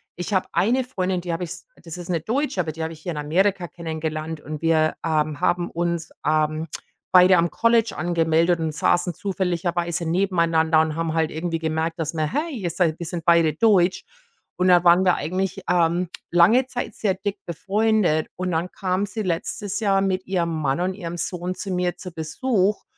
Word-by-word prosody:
ich 180 Hz, +3 st, -3 dB
habe 185 Hz, -, +2 dB
eine 245 Hz, +6 st, +2 dB
Freundin, 185 Hz, -7 st, -2 dB
die 175 Hz, -1 st, -3 dB
habe 170 Hz, +2 st, -2 dB
ich 165 Hz, -, -10 dB, 0.3 s
das 165 Hz, 0 st, -7 dB
ist 175 Hz, -1 st, -8 dB
'ne 170 Hz, -, +1 dB
Deutsche, 250 Hz, -, -1 dB
aber 160 Hz, -, -3 dB
die 160 Hz, +1 st, -5 dB
habe 160 Hz, +1 st, -4 dB
ich 155 Hz, -, -13 dB
hier 175 Hz, -, -4 dB
in -, -, -7 dB
Amerika 180 Hz, +5 st, +1 dB
kennengelernt 160 Hz, -1 st, -5 dB
und 150 Hz, +1 st, -7 dB
wir, 160 Hz, -1 st, +2 dB
ähm, 155 Hz, -1 st, 0 dB
haben 175 Hz, -1 st, +1 dB
uns, 170 Hz, -1 st, -2 dB
ähm, 155 Hz, +1 st, +1 dB, 0.4 s
beide 185 Hz, 0 st, +7 dB
am 170 Hz, 0 st, +2 dB
College 230 Hz, -1 st, +2 dB
angemeldet 170 Hz, 0 st, +2 dB
und 160 Hz, -2 st, -2 dB
saßen 175 Hz, +3 st, +1 dB
zufälligerweise 175 Hz, -2 st, -2 dB
nebeneinander 165 Hz, -3 st, +2 dB
und 160 Hz, -1 st, -1 dB
haben 165 Hz, -1 st, -2 dB
halt 160 Hz, -1 st, +1 dB
irgendwie 165 Hz, +1 st, -2 dB
gemerkt, 160 Hz, 0 st, -2 dB
dass 160 Hz, -1 st, -3 dB
wir, 155 Hz, -2 st, -1 dB
hey, 295 Hz, -7 st, -2 dB
wir 175 Hz, -, -1 dB
sind 165 Hz, -1 st, 0 dB
wir 170 Hz, -, -4 dB
sind 170 Hz, 0 st, -5 dB
beide 170 Hz, -2 st, +4 dB
Deutsch. 190 Hz, -2 st, +3 dB, 0.6 s
Und 185 Hz, 0 st, +3 dB
dann 175 Hz, -1 st, +6 dB
waren 175 Hz, +2 st, +5 dB
wir 180 Hz, -, +5 dB
eigentlich, 190 Hz, +3 st, -2 dB
ähm, 175 Hz, 0 st, +2 dB, 0.2 s
lange 195 Hz, +10 st, +5 dB
Zeit 255 Hz, -1 st, -5 dB
sehr 200 Hz, -3 st, 0 dB
dick 200 Hz, +2 st, -4 dB
befreundet, 195 Hz, -2 st, +1 dB
und 185 Hz, 0 st, -3 dB
dann 170 Hz, +2 st, -1 dB
kam 185 Hz, +1 st, -1 dB
sie 210 Hz, +2 st, -5 dB
letztes 190 Hz, +2 st, -2 dB
Jahr 195 Hz, -3 st, +2 dB
mit 190 Hz, -1 st, -1 dB
ihrem 175 Hz, -3 st, 0 dB
Mann 155 Hz, -3 st, -1 dB
und 185 Hz, +1 st, -1 dB
ihrem 175 Hz, -3 st, -6 dB
Sohn 175 Hz, +1 st, -3 dB
zu 195 Hz, -, -7 dB
mir 180 Hz, -1 st, -1 dB
zu 180 Hz, -, -8 dB
Besuch. 190 Hz, +6 st, 0 dB
175 Hz, 195 wpm, -23 LUFS, 160-190 Hz, 0.6 s, beide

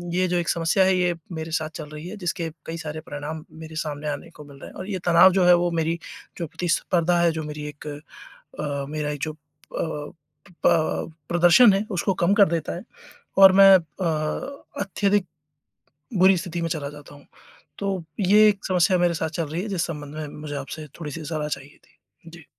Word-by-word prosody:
ये 185 Hz, 0 st, +2 dB
जो 180 Hz, 0 st, 0 dB
एक 170 Hz, -1 st, -1 dB
समस्या 170 Hz, +3 st, +2 dB
है 190 Hz, 0 st, +3 dB
ये 180 Hz, -1 st, +2 dB, 0.2 s
मेरे 160 Hz, -1 st, -5 dB
साथ 155 Hz, -1 st, -1 dB
चल 150 Hz, -2 st, -7 dB
रही 150 Hz, +2 st, -8 dB
है 205 Hz, +4 st, -7 dB
जिसके 175 Hz, -3 st, -3 dB, 0.2 s
कई 165 Hz, -, -5 dB
सारे 155 Hz, -1 st, -5 dB
परिणाम 155 Hz, +1 st, -6 dB
मेरे 160 Hz, 0 st, -10 dB
सामने 150 Hz, -2 st, -4 dB
आने 145 Hz, -, -5 dB
को 150 Hz, -, -12 dB
मिल 140 Hz, -1 st, -14 dB
रहे -, -, -9 dB
हैं -, -, -16 dB
और 185 Hz, -, -6 dB
ये 190 Hz, -2 st, -2 dB
तनाव 175 Hz, +2 st, +7 dB
जो 190 Hz, -1 st, +3 dB
है 180 Hz, -, +8 dB
वो 175 Hz, 0 st, +1 dB
मेरी 165 Hz, 0 st, -1 dB, 0.4 s
जो 170 Hz, -, -3 dB
प्रतिस्पर्धा 175 Hz, +1 st, +1 dB
है, 170 Hz, -1 st, +4 dB
जो 160 Hz, -1 st, -4 dB
मेरी 150 Hz, 0 st, -6 dB
एक 150 Hz, +1 st, -11 dB, 0.5 s
अ, 145 Hz, -2 st, -5 dB
मेरा 150 Hz, -1 st, -2 dB
जो 155 Hz, -, -2 dB
अ, -, -, -21 dB, 1.3 s
प 160 Hz, 0 st, +2 dB, 0.2 s
प्रदर्शन 175 Hz, +6 st, +6 dB
है 195 Hz, +2 st, 0 dB
उसको 190 Hz, +1 st, 0 dB
कम 180 Hz, +4 st, +4 dB
कर 205 Hz, -1 st, +6 dB
देता 165 Hz, -2 st, -2 dB
है 175 Hz, -, -7 dB, 0.6 s
और 195 Hz, -1 st, +10 dB
मैं 195 Hz, +1 st, +8 dB
अ, 165 Hz, -, -3 dB, 0.2 s
अत्यधिक 200 Hz, 0 st, +1 dB, 0.9 s
बुरी 190 Hz, +1 st, +6 dB
स्थिति 175 Hz, -1 st, -4 dB
में 165 Hz, -, -1 dB
चला 150 Hz, -3 st, -3 dB
जाता 145 Hz, 0 st, -13 dB
हूँ। 145 Hz, -, -17 dB, 0.5 s
तो 195 Hz, -3 st, -2 dB, 0.2 s
ये 210 Hz, +2 st, +6 dB
एक 200 Hz, -1 st, -3 dB
समस्या 185 Hz, 0 st, +3 dB
मेरे 175 Hz, -1 st, +2 dB
साथ 160 Hz, -1 st, -2 dB
चल -, -, -1 dB
रही 160 Hz, +4 st, -3 dB
है -, -, -4 dB
जिस 190 Hz, -4 st, -1 dB
संबंध 150 Hz, -3 st, -7 dB
में 155 Hz, -1 st, -5 dB
मुझे 150 Hz, -1 st, -5 dB
आपसे 145 Hz, +2 st, -6 dB
थोड़ी-सी 160 Hz, 0 st, -6 dB
सलाह 155 Hz, -1 st, -3 dB
चाहिए 140 Hz, 0 st, -6 dB
थी। -, -, -30 dB, 0.3 s
जी। 165 Hz, -2 st, -13 dB
165 Hz, 200 wpm, -24 LUFS, 155-185 Hz, 1.3 s, और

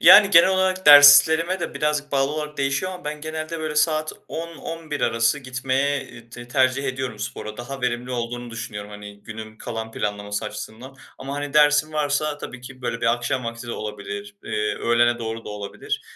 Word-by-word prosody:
Yani, 200 Hz, -1 st, +9 dB
genel 170 Hz, -1 st, +7 dB
olarak 190 Hz, 0 st, 0 dB
derslerime 150 Hz, +5 st, +8 dB
de -, -, -4 dB
birazcık 150 Hz, -1 st, -1 dB
bağlı 135 Hz, +1 st, +1 dB
olarak 150 Hz, -1 st, -5 dB
değişiyor 140 Hz, +7 st, -1 dB
ama 180 Hz, -1 st, -10 dB
ben 150 Hz, 0 st, -5 dB
genelde, 155 Hz, +1 st, -5 dB
böyle, 155 Hz, -1 st, -3 dB
saat 155 Hz, 0 st, +1 dB, 0.2 s
10-11 165 Hz, -2 st, -6 dB
arası 115 Hz, +4 st, +2 dB
gitmeye 135 Hz, +2 st, -2 dB, 0.2 s
te 120 Hz, +1 st, -10 dB
tercih 130 Hz, +1 st, +2 dB
ediyorum 130 Hz, -4 st, -3 dB
spora. 105 Hz, 0 st, -6 dB
Daha 135 Hz, +3 st, -7 dB
verimli 125 Hz, 0 st, -2 dB
olduğunu 120 Hz, 0 st, -4 dB
düşünüyorum, 105 Hz, -2 st, -7 dB
hani, 105 Hz, 0 st, -11 dB
günün 110 Hz, -1 st, -9 dB
kalan 115 Hz, -1 st, -6 dB
planlaması 105 Hz, 0 st, -3 dB
açısından 120 Hz, +5 st, -8 dB, 0.2 s
ama, 135 Hz, +1 st, -6 dB
hani, 145 Hz, 0 st, -4 dB
dersim 150 Hz, +1 st, +4 dB
varsa 150 Hz, 0 st, -1 dB
tabii 125 Hz, -3 st, -8 dB
ki, 130 Hz, +1 st, -12 dB
böyle 115 Hz, -1 st, -3 dB
bir 115 Hz, 0 st, +3 dB
akşam 120 Hz, +1 st, -3 dB
vakti 115 Hz, +1 st, -6 dB
de 120 Hz, -, -4 dB
olabilir, 100 Hz, -1 st, -6 dB
eee, 105 Hz, 0 st, -1 dB
öğlene 120 Hz, 0 st, +2 dB
doğru 115 Hz, 0 st, -5 dB
da -, -, -8 dB
olabilir. 105 Hz, -1 st, -5 dB
130 Hz, 175 wpm, -23 LUFS, 115-150 Hz, 0.2 s, Yani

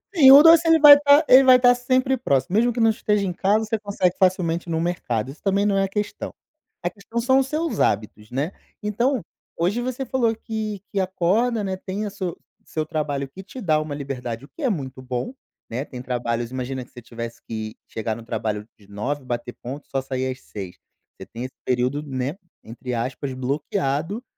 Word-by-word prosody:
Sim, 270 Hz, -6 st, +9 dB
o 280 Hz, +2 st, +11 dB
doce 330 Hz, +1 st, +7 dB
ele 325 Hz, 0 st, +6 dB
vai 290 Hz, -1 st, +11 dB
tá 290 Hz, +1 st, +6 dB
ele 260 Hz, +2 st, +8 dB
vai 255 Hz, -1 st, +7 dB
tá 245 Hz, 0 st, +6 dB
sempre 255 Hz, +2 st, +1 dB
próximo, 140 Hz, -, 0 dB
mesmo 240 Hz, +3 st, +3 dB
que 240 Hz, -, -4 dB
não 225 Hz, -1 st, +5 dB
esteja 210 Hz, -2 st, 0 dB
em 180 Hz, -, -2 dB
casa, 210 Hz, +5 st, +1 dB
você 220 Hz, +1 st, -1 dB
consegue 200 Hz, -4 st, 0 dB
facilmente 180 Hz, -3 st, +1 dB
no 160 Hz, -1 st, 0 dB
mercado, 135 Hz, -9 st, -2 dB
isso 145 Hz, -, -15 dB
também 200 Hz, 0 st, +2 dB
não 200 Hz, -1 st, +2 dB
é 195 Hz, -, +3 dB
a -, -, 0 dB
questão. 205 Hz, +1 st, -4 dB, 0.5 s
A 175 Hz, -, -1 dB
questão 205 Hz, +5 st, -6 dB
são 260 Hz, +3 st, +3 dB
os 270 Hz, -, 0 dB
seus 315 Hz, +4 st, -2 dB
hábitos, 105 Hz, 0 st, -1 dB
né. 140 Hz, +7 st, -1 dB, 0.3 s
Então, 235 Hz, +5 st, 0 dB, 0.4 s
hoje 185 Hz, +8 st, 0 dB
você 255 Hz, +2 st, -3 dB
falou 240 Hz, -4 st, +1 dB
que 215 Hz, -3 st, -5 dB
que 200 Hz, -, -1 dB
acorda, 195 Hz, +5 st, +1 dB
né, 190 Hz, -1 st, -2 dB
tem 190 Hz, +3 st, -5 dB
a -, -, -3 dB
su 190 Hz, -4 st, -5 dB, 0.3 s
seu 155 Hz, -1 st, -3 dB
trabalho 145 Hz, -3 st, -2 dB
que 185 Hz, +8 st, -10 dB
te 250 Hz, +7 st, -10 dB
dá 155 Hz, -7 st, +2 dB
uma 155 Hz, -2 st, -4 dB
liberdade, 125 Hz, -4 st, -5 dB
o -, -, -20 dB
que -, -, -13 dB
é 270 Hz, -, +2 dB
muito 135 Hz, -, -4 dB
bom, 130 Hz, -, -4 dB, 0.4 s
né, 125 Hz, +4 st, -3 dB
tem 125 Hz, -4 st, -8 dB
trabalhos 120 Hz, -1 st, -2 dB
imagina 130 Hz, 0 st, -4 dB
que -, -, -27 dB
você 125 Hz, -, -11 dB
tivesse 115 Hz, 0 st, -8 dB
que 110 Hz, -1 st, -5 dB
chegar 110 Hz, 0 st, -3 dB
no 115 Hz, -, -10 dB
trabalho 105 Hz, -2 st, -3 dB
de 100 Hz, -, -21 dB
9h 130 Hz, +8 st, -3 dB
bater 120 Hz, 0 st, -4 dB
ponto 135 Hz, +4 st, -7 dB
e -, -, -38 dB
só 135 Hz, -, -1 dB
sair 130 Hz, 0 st, -2 dB
às 130 Hz, -, -8 dB
18h. 95 Hz, -3 st, -8 dB, 0.4 s
Você -, -, -8 dB
tem 115 Hz, +2 st, -8 dB
esse 130 Hz, +1 st, -7 dB
período, 125 Hz, +3 st, 0 dB
né, 135 Hz, +2 st, -3 dB, 0.3 s
entre 125 Hz, +3 st, -7 dB
aspas 125 Hz, +3 st, -3 dB
"bloqueado", 140 Hz, -, -2 dB
170 Hz, 210 wpm, -23 LUFS, -, 0.5 s, o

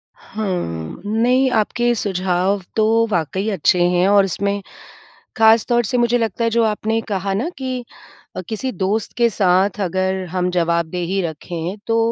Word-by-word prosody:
हाँ, 180 Hz, -, -5 dB
नहीं 245 Hz, +5 st, +2 dB
आपके 240 Hz, +3 st, +1 dB
सुझाव 190 Hz, -1 st, 0 dB
तो 220 Hz, -, +3 dB, 0.3 s
वाक़ई 190 Hz, +5 st, -1 dB
अच्छे 180 Hz, -1 st, +2 dB
हैं 180 Hz, +1 st, +2 dB
और 200 Hz, -1 st, +5 dB
इसमें 200 Hz, +2 st, -2 dB, 0.8 s
ख़ासतौर 225 Hz, +2 st, +4 dB
से 245 Hz, +4 st, -1 dB
मुझे 240 Hz, 0 st, +2 dB
लगता 225 Hz, 0 st, -1 dB
है 230 Hz, -, +2 dB
जो 230 Hz, +1 st, +2 dB
आपने 220 Hz, +1 st, 0 dB
कहा 195 Hz, -1 st, -2 dB
ना 235 Hz, -, -1 dB
कि 255 Hz, -2 st, -4 dB, 0.5 s
अ, -, -, -2 dB
किसी 255 Hz, +4 st, -3 dB
दोस्त 200 Hz, +2 st, -2 dB
के 235 Hz, -1 st, +4 dB
साथ 195 Hz, 0 st, +2 dB
अगर 190 Hz, +1 st, -1 dB
हम 180 Hz, -1 st, 0 dB
जवाबदेही 170 Hz, +2 st, 0 dB
रखें 170 Hz, +2 st, -5 dB
तो 225 Hz, -, +2 dB
200 Hz, 150 wpm, -19 LUFS, 180-225 Hz, 0.8 s, और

